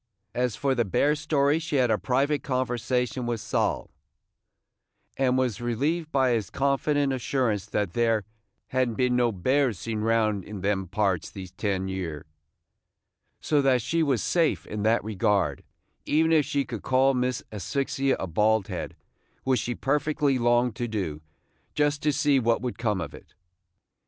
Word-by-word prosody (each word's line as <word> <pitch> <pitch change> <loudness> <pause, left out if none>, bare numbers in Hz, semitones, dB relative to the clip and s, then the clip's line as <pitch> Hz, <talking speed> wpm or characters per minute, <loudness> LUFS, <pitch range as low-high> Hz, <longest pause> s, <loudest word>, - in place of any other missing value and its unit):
As 125 -3 0
for 135 +3 0
the 120 -2 +1
bear 140 +9 +2
story 150 0 +1
she 160 -2 -4
had 125 -4 +3
a 110 - +3
private 140 +3 +1
conversation 125 -1 -1
with 120 -1 -1
Sol, - - -1 1.2
and 130 -1 +2
was 125 -5 0
relieved 150 +8 -1
by 130 -2 +3
his 110 -6 0
confident 140 0 +1
assurance 120 -5 -1
that 105 -5 -2
there 115 -3 +1 0.4
"had 130 -1 +1
n't 115 - -6
been 125 -1 +2
no 120 -1 +3
bears 130 +4 +1
seen 110 +3 -4
round 110 -3 +1
in 105 -1 -8
them 95 -1 0
parts 95 -2 0
these 95 -3 -9
ten 95 -1 -2
year"; 90 -6 -4 1.2
so 150 -2 +2
that 130 -4 +3
she 165 +7 0
was 135 -7 +1
safe 165 -3 +1
in 105 0 -5
that 110 +2 +2
regard, 100 -7 0 0.4
even 160 +2 +3
if 155 -3 +4
she 140 -1 -1
should 115 -4 -5
call 135 +1 +3
Miss 125 -1 -1
Asphyxia 135 +6 -1
a - - -2
bald 105 +4 +1
head, - - -5 0.5
which 130 -2 +2
she 120 +3 -3
perfectly 145 -1 +1
longed 120 -1 +2
to 120 - -2
do, 95 -9 -3 0.5
just 145 0 +1
to 150 - +2
see 145 -1 +3
what 115 0 +1
would 125 -2 -4
come 105 -4 0
of 85 -4 -5
it. - - -15
125 Hz, 165 wpm, -26 LUFS, 105-140 Hz, 1.2 s, if